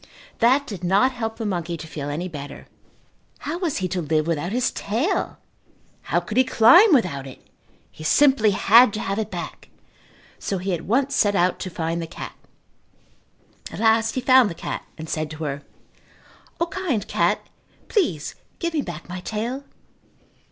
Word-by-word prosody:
That 260 +5 +4
did 200 -8 -8
not 200 +9 +3
help 225 -3 -4
the 225 - -4
monkey 175 -4 -2
to 160 - -8
feel 145 -3 -6
any 165 +5 -3
better. 145 -4 -8 0.8
How 315 +4 -4
was 345 -6 -1
he 185 - -1
to 180 0 -2
live 155 -1 0
without 165 +2 -2
his 245 +2 +1
tail! 255 - -1 0.7
How - - +3
could 215 - -6
he 260 - +7
climb 260 - +6
without 175 - +2
it! 130 - -13 0.5
He 155 - -12
simply 260 - +4
had 215 +3 +6
to 215 - -3
have 195 0 -2
it 220 - -2
back 175 -4 -7 0.7
so 195 - -2
he 185 +1 -2
at 170 - -4
once 270 +6 +1
set 205 -1 +3
out 180 -1 +2
to 185 - -4
find 165 -1 -3
the 165 - -5
cat. - - -8 1.4
At - - -7
last 225 0 +3
he 255 - -1
found 255 -3 +5
the 165 - -7
cat - - -5
and 160 - -7
said 155 -1 -2
to 155 +1 -7
her, 140 -1 -3 1.0
"O, 340 - +2
kind 335 - -2
cat, - - +1 0.4
please 240 - 0 0.2
give 340 -1 -2
me 305 - +1
back 170 - -8
my 180 +1 -6
tail." 235 +8 -4
205 Hz, 175 wpm, -23 LUFS, 170-255 Hz, 1.4 s, he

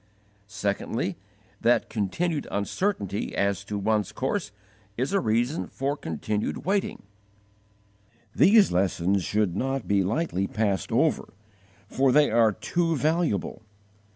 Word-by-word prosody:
Secondly, 100 -1 -2 0.5
that 120 +1 +3
continued 145 - -2
uncertainty 100 - -2
as 100 0 0
to 105 +1 -4
one's 105 -1 0
course 100 - -2 0.5
is 130 +10 -1
a 200 - +4
reason 120 - 0
for 140 +2 -2
continued 105 - -3
waiting. 195 +2 -1 1.3
These 205 +1 +5
lessons 95 +1 +1
should 105 -3 0
not 135 +5 -2
be 100 -1 +2
lightly 100 - -1
passed 100 -6 -1
over, - - +1 0.5
for 135 0 +2
they 145 -1 +4
are 115 -1 +4
too 165 - -1
valuable. 155 - 0
110 Hz, 115 wpm, -26 LUFS, 100-150 Hz, 1.3 s, These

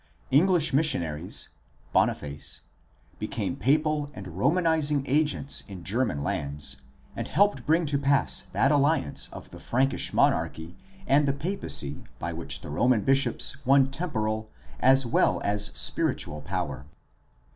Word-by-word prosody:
English 160 +2 +4
missionaries 85 - 0 0.4
(Boniface) 75 0 -1 0.6
became - - -3
papal 150 +4 +1
and 95 -2 -8
Romanizing 150 - +1
agents 145 0 +1
in 95 -4 -9
German 105 - -1
lands 70 0 -2 0.4
and - - -4
helped 205 -4 +1
bring 165 +2 +3
to 145 -2 0
pass 140 0 +3
that 135 - +2
alliance 145 - +1
of - - -11
the - - -11
Frankish 135 +3 0
monarchy 80 +2 0 0.3
and 140 +1 +3
the 140 - +2
papacy 140 - -2
by 85 +1 -4
which 75 -3 -4
the 75 - -8
Roman 120 +8 +2
bishops 135 +2 +1
won 135 0 +4
temporal 110 -9 -3 0.3
as 135 +1 +4
well 120 - +2
as 105 0 +3
spiritual 75 0 0
power. 65 0 -4
135 Hz, 125 wpm, -26 LUFS, 90-150 Hz, 0.6 s, English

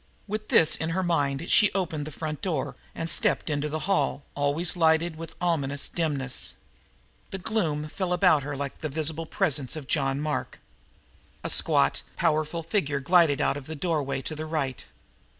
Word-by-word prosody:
With 215 +1 -4
this 160 - +5
in 160 - -3
her 190 - +1
mind 150 -3 0
she 210 - +6
opened 160 -6 -2
the - - -6
front 150 0 -5
door 140 -7 -2 0.2
and 165 - -3
stepped 165 0 +1
into 150 +1 -1
the 155 +1 -3
hall, 195 -6 0
always 145 +5 +1
lighted 160 0 +2
with 165 0 -8
ominous 140 -6 0
dimness. 145 -6 -2 0.7
That 190 -2 -7
gloom 165 -9 -1
fell 180 +3 -3
about 180 -4 +4
her 140 0 -5
like 140 0 -5
the 155 - -3
visible 160 +2 -1
presence 140 -4 0
of 155 -3 -7
John 135 -1 0
Mark. 150 0 -3 0.9
A - - -1
squat, - - +5
powerful 155 +2 0
figure 160 -6 -1
glided 160 -1 +4
out - - +1
of 140 - -9
the 160 - -5
doorway 145 -4 -2
to 155 - -3
the 155 +1 -5
right. 140 -5 -2
155 Hz, 170 wpm, -26 LUFS, 145-170 Hz, 0.9 s, she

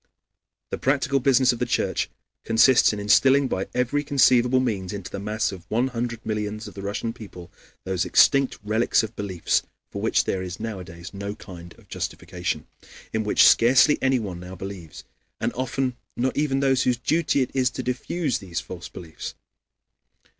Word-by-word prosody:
The - - -3
practical 140 0 +1
business 130 -1 +4
of 120 - -7
the 125 - +1
Church - - 0 0.3
consists 115 +3 +5
in 105 - -4
instilling 135 +7 +4
by 95 -5 -2
every 125 +4 0
conceivable 130 -3 +4
means 105 -8 -2
into 95 -3 -7
the - - -5
mass 105 +2 -1
of 90 -2 -11
one 120 +4 +1
hundred 120 -1 -4
millions 105 0 -3
of - - -10
the 100 - -8
Russian 100 +3 -3
people 100 -7 -11 0.3
those 95 -2 -1
extinct 135 -1 +4
relics 110 +3 +2
of 110 +1 -6
beliefs 95 -4 0 0.3
for - - -5
which - - +2
there 95 - -2
is 90 0 -6
nowadays 95 -6 -7
no 100 +1 -5
kind 85 -4 -11
of - - -21
justification, - - -4 0.5
"in 110 0 0
which 105 - +5
scarcely 130 +5 +5
anyone 115 -9 0
now 90 +1 -9
believes, 95 -4 -8 0.4
and - - -1
often 130 0 -2 0.2
not 130 +2 0
even 140 -2 +1
those 135 -1 +3
whose 125 -1 +1
duty 150 +3 +1
it 125 - -6
is 130 -1 +2
to 130 +1 -6
diffuse 135 +3 -2
these 90 -4 -4
false 85 -2 -8
beliefs." 80 -3 -8
115 Hz, 170 wpm, -24 LUFS, 100-130 Hz, 0.5 s, consists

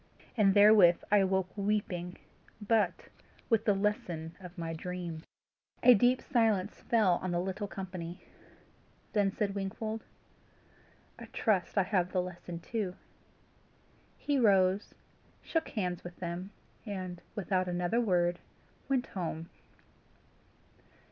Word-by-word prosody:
And 200 -4 +4
therewith 205 -4 +8 0.2
I 210 - +6
awoke 190 -1 0
weeping, 195 -4 -2 0.4
but 210 -4 0 0.4
with 225 -1 +3
the 205 - +4
lesson 175 -5 -2
of 180 -1 -11
my 165 -1 -3
dream." 170 -1 -5 0.6
A 250 - +9
deep 245 +4 +3
silence 220 -6 +1
fell 210 -7 +3
on 185 - -2
the 175 0 0
little 190 +3 -3
company. 180 -3 -6 0.9
Then 205 -2 +3
said 200 0 -1
Wingfold, 215 +3 -4 1.2
"I - - -8
trust 205 -3 0
I 195 - +5
have 185 -1 0
the 185 - +2
lesson 175 -1 -7
too." 200 -4 -3 1.2
He 285 -2 0
rose, 195 -3 +3 0.5
shook 325 -1 -1
hands 180 -5 -3
with 175 0 -8
them, 175 +2 -5 0.3
and, 185 -5 -5
without 185 -3 0
another 180 +6 0
word, 175 -5 +1 0.5
went 265 -2 +1
home. 165 -3 -5
190 Hz, 120 wpm, -31 LUFS, 175-210 Hz, 1.2 s, A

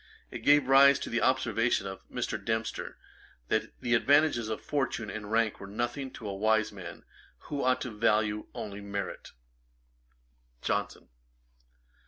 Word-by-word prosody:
It - - -5
gave 145 -2 +4
rise 140 +1 +7
to - - -5
an 115 - +1
observation 125 -5 +2
by 95 0 -6
Mr. - - -3
Dempster, 110 0 -3 0.5
that - - -1
the 120 - 0
advantages 140 -2 +3
of 110 - -2
fortune 120 -7 -2
and 105 0 -6
rank 115 -1 +1
were 100 - -8
nothing 120 +6 -3
to 110 - -8
a 100 - -3
wise 110 +2 +2
man, 95 -5 -9 0.5
who 145 -1 -2
ought 130 0 +2
to 125 - -4
value 105 -1 +1
only 100 -1 -6
merit. 100 -1 -5 1.3
JOHNSON. - - -2
110 Hz, 145 wpm, -29 LUFS, 105-130 Hz, 1.3 s, rise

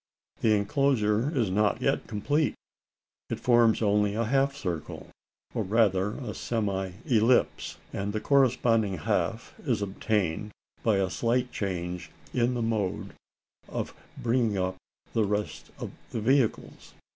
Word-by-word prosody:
The 110 -1 +4
enclosure 110 +1 +2
is 110 -7 +1
not 105 0 +2
yet - - 0
complete. 145 +8 0 0.7
It - - -3
forms 120 -2 +4
only 105 0 +2
a 115 +1 +1
half 135 +3 +2
circle, 90 - -5 0.4
or - - -1
rather 100 -1 +2
a 120 -6 -5
semi 100 -5 -2
ellipse; 120 -3 +2 0.2
and 100 +1 -2
the 110 - -2
corresponding 115 -7 +3
half 75 - -1
is - - +1
obtained, 100 -1 -1 0.3
by 110 -3 +3
a 95 -1 0
slight 125 +5 0
change 90 -3 -3 0.2
in 125 0 +2
the 120 - -1
mode 110 -5 -1 0.6
of - - -3 0.2
bringing 115 -3 +1
up 95 0 -1 0.4
the 115 - +3
remaining 105 0 0 0.6
vehicles. 120 +2 0
110 Hz, 125 wpm, -28 LUFS, 100-120 Hz, 0.7 s, The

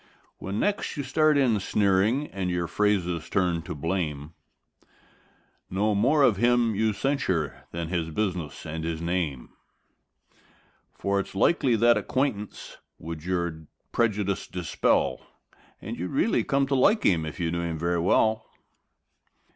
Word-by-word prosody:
When 100 +3 -4
next 205 -5 -1
you 145 - -2
start 150 +3 +3
in 120 -6 +3
sneering 100 +7 +2
and 95 -2 -3
your 90 -1 -1
phrases 90 -4 0
turn 90 -4 +1
to 80 - -6
blame, 75 -1 -3 1.4
Know 105 +3 +1
more 135 +9 +3
of 115 -7 +4
him 120 0 +3
you 110 +2 +1
censure 100 - -1
than 85 -1 -5
his 85 -3 -1
business 85 -5 -3
and 80 0 -5
his 80 -1 -3
name; 85 -6 -2 1.4
For 100 0 -1
it's 95 - -5
likely 125 - +3
that 120 +1 +4
acquaintance 105 -1 -3 0.2
would 80 -1 -7
your 85 -3 -3 0.2
prejudice 105 -4 0
dispel 80 -6 0 0.6
And - - -7
you'd 90 +1 -3
really 210 +11 +1
come 140 -1 +1
to 135 - -2
like 205 - +3
him 85 -4 +3
if 80 -3 -6
you 85 -1 -1
knew 85 0 -1
him 85 -1 -3
very 85 +2 0
well. 110 +5 +2
95 Hz, 140 wpm, -26 LUFS, 85-115 Hz, 1.4 s, of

